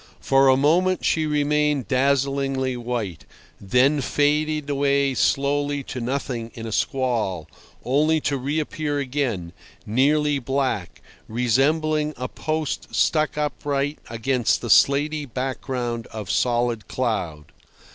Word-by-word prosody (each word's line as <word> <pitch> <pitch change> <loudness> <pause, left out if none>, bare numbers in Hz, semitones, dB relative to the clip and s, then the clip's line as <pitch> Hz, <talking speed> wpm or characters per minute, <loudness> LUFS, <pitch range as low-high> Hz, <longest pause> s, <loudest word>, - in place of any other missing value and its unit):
For 135 0 +3
a 130 - +5
moment 175 +6 +2
she 160 -1 +1
remained 150 -2 +1
dazzlingly 135 -1 +1
white, 120 -7 -4 0.4
then 130 +9 +2
faded 150 +2 +1
away 140 -1 +1
slowly 145 +1 +1
to 125 - -6
nothing 120 -2 -3
in 115 - -7
a 110 - -5
squall, 115 - -1 0.4
only 155 +5 +2
to 145 - 0
reappear 145 +2 -2
again, 125 -11 -2 0.3
nearly 145 +5 +2
black, 120 - -2 0.2
resembling 150 +6 +1
a 125 - -3
post 155 +2 -3
stuck 155 -2 +2
upright 145 -1 -2
against 120 +1 0
the 120 - -2
slaty 145 +3 +3
background 125 -2 -3
of 105 -4 -6
solid 120 -2 0
cloud. 85 -12 -3
135 Hz, 115 wpm, -23 LUFS, 120-145 Hz, 0.4 s, a